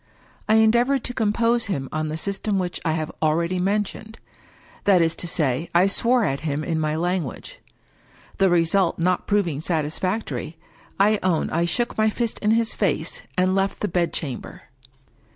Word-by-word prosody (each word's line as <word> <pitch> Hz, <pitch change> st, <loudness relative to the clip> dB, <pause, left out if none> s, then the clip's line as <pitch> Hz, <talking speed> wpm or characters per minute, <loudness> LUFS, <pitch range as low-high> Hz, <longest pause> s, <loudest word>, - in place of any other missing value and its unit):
I 220 Hz, -, +5 dB
en 220 Hz, 0 st, +6 dB
deavored 245 Hz, +3 st, +2 dB
to 245 Hz, -, -4 dB
compose 230 Hz, +1 st, +1 dB
him 140 Hz, -9 st, -2 dB
on 155 Hz, 0 st, -2 dB
the 155 Hz, +1 st, -3 dB
system 200 Hz, +3 st, -2 dB
which 180 Hz, -2 st, -2 dB
1 160 Hz, -2 st, 0 dB
have 155 Hz, -1 st, -3 dB
al 155 Hz, -1 st, +3 dB
ready 170 Hz, +2 st, -1 dB
mentioned 205 Hz, +3 st, -2 dB, 0.4 s
— -, -, -27 dB
^that 195 Hz, -3 st, +6 dB
is 165 Hz, -1 st, +2 dB
to 175 Hz, -, -3 dB
say, 155 Hz, -2 st, -1 dB
I 175 Hz, +2 st, +6 dB
swore 235 Hz, +4 st, +2 dB
at 135 Hz, -4 st, -1 dB
him 150 Hz, -1 st, -2 dB
in 160 Hz, -1 st, -1 dB
my 155 Hz, 0 st, 0 dB
lan* 175 Hz, +3 st, 0 dB
guage. 135 Hz, -6 st, -8 dB, 0.8 s
The 195 Hz, -1 st, +4 dB
result 175 Hz, +1 st, +2 dB
not 180 Hz, +1 st, 0 dB
proving 175 Hz, -8 st, 0 dB
satisfactory, 160 Hz, -, -2 dB, 0.4 s
I 210 Hz, +1 st, +4 dB
own 180 Hz, -4 st, 0 dB
I 170 Hz, +1 st, +1 dB
shook 240 Hz, +6 st, -1 dB
my 220 Hz, 0 st, +4 dB
fist 230 Hz, +1 st, -2 dB
in 210 Hz, -, 0 dB
his 225 Hz, 0 st, +2 dB
face, 165 Hz, -4 st, -1 dB, 0.2 s
and 185 Hz, +1 st, +3 dB
left 195 Hz, 0 st, 0 dB
the 210 Hz, -, 0 dB
bedchamber. 170 Hz, -7 st, -3 dB
180 Hz, 180 wpm, -23 LUFS, 160-210 Hz, 0.8 s, en